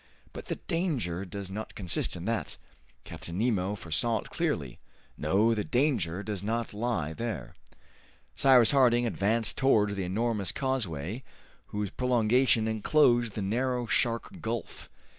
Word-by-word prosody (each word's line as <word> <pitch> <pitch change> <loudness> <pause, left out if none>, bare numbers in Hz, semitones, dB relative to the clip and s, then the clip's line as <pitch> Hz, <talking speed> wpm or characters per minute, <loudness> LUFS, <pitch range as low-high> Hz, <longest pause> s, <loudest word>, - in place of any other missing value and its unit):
But - - -9
the - - -2
danger 135 - -2
does 95 +1 -7
not 110 +3 -6
consist 90 -3 -2
in 85 0 -7
that! 115 0 -2 0.5
Captain 85 +1 -8
Nemo 105 -3 0
foresaw 100 +6 +1
it - - -14
clearly! 80 - -2 0.4
No, 110 +4 +2
the 105 -2 -1
danger 110 - 0
does 105 -2 -4
not 115 +2 -2
lie 105 -8 -2
there!" 80 - -5 0.8
Cyrus 130 -4 +6
Harding 120 -3 +4
advanced 110 +1 0
towards 105 -6 +3
the 100 -1 -3
enormous 105 +2 -1
causeway 115 - -2 0.5
whose 105 -1 -3
prolongation 125 -1 +2
enclosed 120 0 +3
the 105 - -2
narrow 125 +4 0
Shark 120 - 0
Gulf. 115 0 -5
110 Hz, 135 wpm, -29 LUFS, 100-120 Hz, 0.8 s, Cyrus